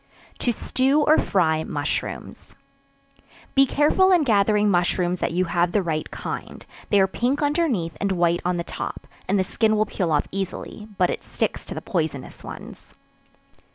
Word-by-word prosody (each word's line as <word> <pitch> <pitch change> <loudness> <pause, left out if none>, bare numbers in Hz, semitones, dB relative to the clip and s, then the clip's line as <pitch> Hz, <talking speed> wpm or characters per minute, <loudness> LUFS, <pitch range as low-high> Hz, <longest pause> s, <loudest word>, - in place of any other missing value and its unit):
To 245 - +1
Stew 265 +5 +1
or 305 +1 +4
Fry 160 -4 +1
Mushrooms. 145 -2 -4 1.0
Be 275 0 +5
careful 305 +8 +3
in 350 -4 +5
gathering 210 -3 +3
mushrooms 175 0 +1
that - - -1
you 180 +2 +1
have 175 0 0
the 205 - +2
right 155 -2 -2
kind; - - -6 0.2
they 205 - +4
are 190 - +5
pink 250 +9 -1
underneath, 285 - 0
and 200 0 +1
white 175 -1 +2
on 180 0 0
the 170 - -2
top, - - -6 0.2
and 200 - +2
the 190 - +2
skin 215 +3 +1
will 215 - +3
peel 180 -5 -2
off 145 -1 +1
easily, 195 +2 -5
but 180 - +3
it - - -5
sticks - - -2
to - - -7
the - - -6
poisonous 155 - -3
ones. - - -10
195 Hz, 170 wpm, -23 LUFS, 175-240 Hz, 1.0 s, Be